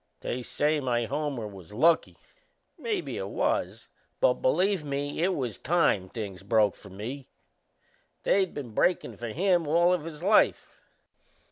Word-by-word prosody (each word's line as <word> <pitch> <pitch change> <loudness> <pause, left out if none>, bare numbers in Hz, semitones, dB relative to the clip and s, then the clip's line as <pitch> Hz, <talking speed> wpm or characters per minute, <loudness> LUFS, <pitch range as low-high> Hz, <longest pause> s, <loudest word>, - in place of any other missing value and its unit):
They 125 - -3
say 150 +5 0
my 120 -3 0
homer 140 -3 -3
was 95 -3 -12
lucky. 160 +8 +3 0.6
Maybe 425 -6 -3
it - - -3
was; - - -1 0.3
but, - - +3
believe 200 - +2
me, 145 +1 -3
it 185 +2 +2
was 125 -7 -3
time 145 - +2
things 100 -4 -6
broke 105 0 +3
for 100 - -14
me. 120 +8 -7 1.0
They 195 -1 +3
been 140 -8 -7
breakin' 180 +11 +1
for 120 - -6
him 175 - +1
all 170 +4 +4
his 160 -1 -7
life." 210 +3 +2
145 Hz, 140 wpm, -28 LUFS, 115-175 Hz, 1.0 s, all